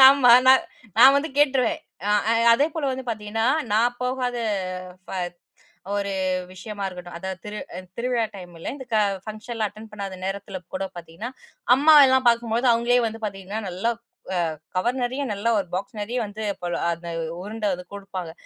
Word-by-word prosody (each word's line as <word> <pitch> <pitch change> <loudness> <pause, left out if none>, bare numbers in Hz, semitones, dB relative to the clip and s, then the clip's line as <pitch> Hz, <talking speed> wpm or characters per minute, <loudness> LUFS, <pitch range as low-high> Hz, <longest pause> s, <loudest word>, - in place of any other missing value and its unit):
ஆமா, 265 -3 +6
நா 260 - +10 0.5
நான் 270 +3 +9
வந்து 305 +3 0
கேட்ருவேன். 290 +2 +3 0.3
அ, - - +2 0.2
அ, - - +4 0.2
அதேபோல 295 +4 +1
வந்து 260 0 -4
பாத்தீங்கன்னா, 220 0 -2 0.3
நான் 235 +3 +3
போகாத, 250 -1 -1 0.7
ஃப - - -11 0.9
ஒரு 200 -1 -1 0.4
விஷயமா 200 +2 -7
இருக்கட்டும், 180 -2 -8
அதாவது 190 +1 -5
திரு 210 0 -5 0.2
அந் 185 -1 -9
திருவிழா 240 -1 +1
டைமுல, 175 -3 -7
இந்த 265 -3 -9
கா 215 - +5 0.2
ஃபங்ஷன்ல்லாம் 215 0 -3
அட்டெண்ட் 215 +1 -13
பண்ணாத 200 -2 -5
நேரத்துல 195 0 -4 0.2
கூட 195 +1 -1
பாத்தீங்கன்னா, 175 +7 -7 0.5
அம்மாவ 295 +1 +8
எல்லாம் 260 0 +3
பாக்கும் 235 -1 +3
பொழுது, 240 +3 +2
அவுங்களே 240 +2 +3
வந்து 225 0 -7
பாத்தீங்கன்னா, 195 +1 -5
நல்லா 190 +7 0 0.6
அ, - - -14 0.2
கவர் 245 +7 0
நெறையா, 260 +3 -1
நல்லா 220 +4 0
ஒரு 190 -3 -2
பாக்ஸ் 210 +4 -4
நெறைய 235 +5 -2
வந்து, 215 +2 -6 0.2
போல, 175 -1 -2
அந்த 170 0 -8 0.3
உருண்ட 215 +2 -4
வந்து 180 0 -9
குடுப்பாங்க. 190 -4 -6
220 Hz, 165 wpm, -24 LUFS, 195-250 Hz, 0.9 s, நா